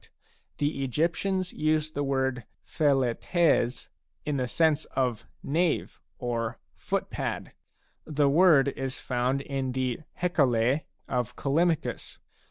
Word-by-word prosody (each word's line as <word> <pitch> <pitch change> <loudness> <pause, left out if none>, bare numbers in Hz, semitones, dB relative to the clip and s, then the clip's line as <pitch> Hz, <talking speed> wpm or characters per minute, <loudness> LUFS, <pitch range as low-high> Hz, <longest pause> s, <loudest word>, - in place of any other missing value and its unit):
6 - - -21 0.5
The 145 -1 -1
Egyptians 175 - 0
used 155 0 0
the 145 - -1
word 130 -2 0 0.2
^^Xi/r^s 135 -1 +1 0.4
in 150 -2 0
the 125 -1 0
sense 155 +2 +2
of 125 -4 -2
*' - - -40
knave 175 -2 0
" - - -47
or 115 -2 -2
" - - -47
foot - - -3
pad." - - -3 0.5
The 150 -2 +2
word 145 -2 +5
is 135 -1 -4
found 130 +2 0
in 135 -2 -3
the 130 -2 -1 0.2
Hecale 135 -5 +2 0.2
of 125 -3 -2
Callimachus. 160 +3 0
140 Hz, 130 wpm, -28 LUFS, 125-155 Hz, 0.5 s, word